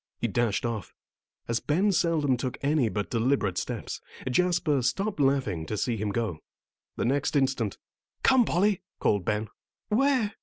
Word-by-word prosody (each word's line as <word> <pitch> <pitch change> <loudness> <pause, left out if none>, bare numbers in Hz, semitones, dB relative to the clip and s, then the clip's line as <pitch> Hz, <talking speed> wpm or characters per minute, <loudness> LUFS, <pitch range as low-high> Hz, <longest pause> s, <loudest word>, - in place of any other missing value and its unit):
He 120 - -1
dashed 115 0 0
off. 115 -6 -4 0.5
As 115 0 0
Ben 185 +8 +2
seldom 165 -6 +2
took 125 +1 -3
any 140 -4 +2
but 105 -1 -3
deliberate 115 -6 +1
steps, - - -5 0.3
Jasper 170 0 +2
stopped 195 - -1
laughing 130 - +1
to 110 - -3
see 120 +3 0
him 105 -1 -2
go. 105 -6 -2 0.6
The - - -1
next 140 +4 0
instant, 130 -7 +1 0.5
"Come, 260 -2 +6
Polly!" 200 -1 +1 0.2
called 100 -4 +1
Ben. 105 0 -1 0.4
"Where?" 245 -2 +2
130 Hz, 150 wpm, -27 LUFS, 110-170 Hz, 0.6 s, Come